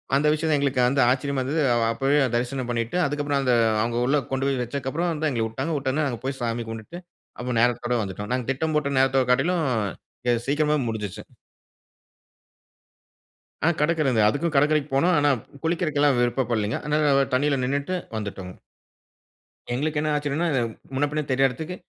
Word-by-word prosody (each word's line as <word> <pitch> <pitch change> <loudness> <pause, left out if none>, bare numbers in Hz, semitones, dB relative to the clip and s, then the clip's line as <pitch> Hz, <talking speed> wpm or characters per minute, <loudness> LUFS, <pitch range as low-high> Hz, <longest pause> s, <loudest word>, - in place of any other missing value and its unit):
அந்த 145 +2 +3
விஷயம் 155 +1 0
தான் 150 - +3
எங்களுக்கு 140 -2 +1
வந்து 135 +1 +2
ஆச்சரியமா 135 +1 0
இருந்தது. 150 +5 -1
அ - - +2 0.2
அப்பவே 140 +4 +2 0.2
தரிசனம் 125 +1 -2
பண்ணிட்டு 115 +6 -1
அதுக்கப்பறம் 145 -1 -1
அந்த 125 -2 +2 0.3
அவுங்க 115 +1 -1
உள்ள 145 +1 +3
கொண்டு 135 +1 0
போய் 135 -2 -1
வெச்சதுக்கு 130 +2 -3
அப்புறம் 170 +3 -1
வந்து 155 0 -1
எங்கள 115 -3 0
விட்டாங்க 135 +8 -3
விட்ட 135 - -2
உடனே 150 +3 0
நாங்க 120 -3 -4
போயி 135 0 -2
சாமி 115 0 -2
கும்புட்டு 115 +10 -7 0.4
அப்ப 125 - -5
நேரத்தோட 120 0 +1
வந்துட்டோம். 100 +1 -6
நாங்க 125 -2 -1
திட்டம் 155 +4 -2
போட்ட 140 -2 -1
நேரத்தோட 135 0 +3
காட்டிலும், 165 +7 +2 0.7
எ - - +4
சீக்கிரமா 150 +1 +2
முடிஞ்சிருச்சி. 105 -4 -4 2.4
ஆன 170 - +5
கடற்கரை 150 -3 +2
இந்த 110 - +3
அதுக்கும் 155 +8 0
கடற்கரைக்கும் 150 0 +2
போனோம். 175 +5 +3
ஆனா, 145 - +3 0.3
குளிக்கிறக்குலாம் 155 -5 +1
விருப்பப் 120 0 0
படலேங்க. 110 -1 0
அதனால 150 -1 +2
அ - - -2
தண்ணீல 140 0 +1
நின்னுட்டு 140 +7 -1 0.2
வந்துட்டோங்க. 95 -3 -6 1.2
எங்களுக்கு 150 +4 -1
என்ன 155 0 0
ஆச்சரியம்னா, 150 +3 -1
இது 130 - +2 0.3
முன்ன 145 +2 +1
பின்ன 150 0 -2
தெரியாத 135 +1 +3
எடத்துக்கு 160 +7 -6
140 Hz, 170 wpm, -24 LUFS, 125-150 Hz, 2.4 s, ஆன